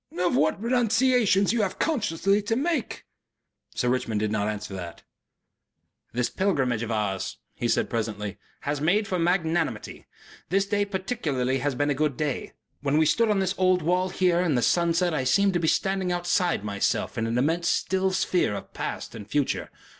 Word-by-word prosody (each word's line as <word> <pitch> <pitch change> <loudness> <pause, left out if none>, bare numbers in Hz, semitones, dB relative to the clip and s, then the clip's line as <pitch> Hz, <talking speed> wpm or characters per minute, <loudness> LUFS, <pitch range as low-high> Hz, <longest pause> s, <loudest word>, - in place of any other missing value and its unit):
"Of 180 -6 +1
what 150 +7 +2
renunciations 235 -3 +3
you 235 - +1
have 195 -3 -1
consciously 205 - +1
to 210 +2 -1
make." 295 0 -2 0.7
Sir 125 - 0
Richmond 125 -4 0
did 105 0 -1
not 105 -1 0
answer 105 -2 -4
that.... 85 -3 -7 1.1
"This 125 +1 0
pilgrimage 135 - 0
of 115 - -3
ours," 105 -4 -2 0.2
he - - -2
said, - - +1
presently, 105 -3 -3 0.2
"has 145 0 -2
made 200 +7 +2
for 185 - -1
magnanimity. 170 -1 -1 0.4
This 195 +3 +2
day 205 0 0
particularly 170 - -1
has 145 -2 -1
been 145 +3 +1
a - - +3
good 145 -1 -1
day. 150 -3 -3 0.3
When 145 +1 +1
we 160 - +4
stood 220 +10 +3
on 210 - +2
this 190 -1 +1
old 185 -2 +3
wall 180 +3 +1
here 180 -2 +2
in 175 -6 +1
the 120 - +1
sunset 170 0 +2
I 140 -4 0
seemed 195 +10 +3
to 175 - +1
be 165 - 0
standing 190 +1 +1
outside 175 - 0
myself 100 -1 -1
in 115 - -1
an 115 +1 -1
immense 165 +6 +1
still 190 0 +1
sphere 180 - +1
of - - -8
past - - -5
and 110 -2 -9
future. 145 -2 -1
170 Hz, 180 wpm, -26 LUFS, 125-195 Hz, 1.1 s, we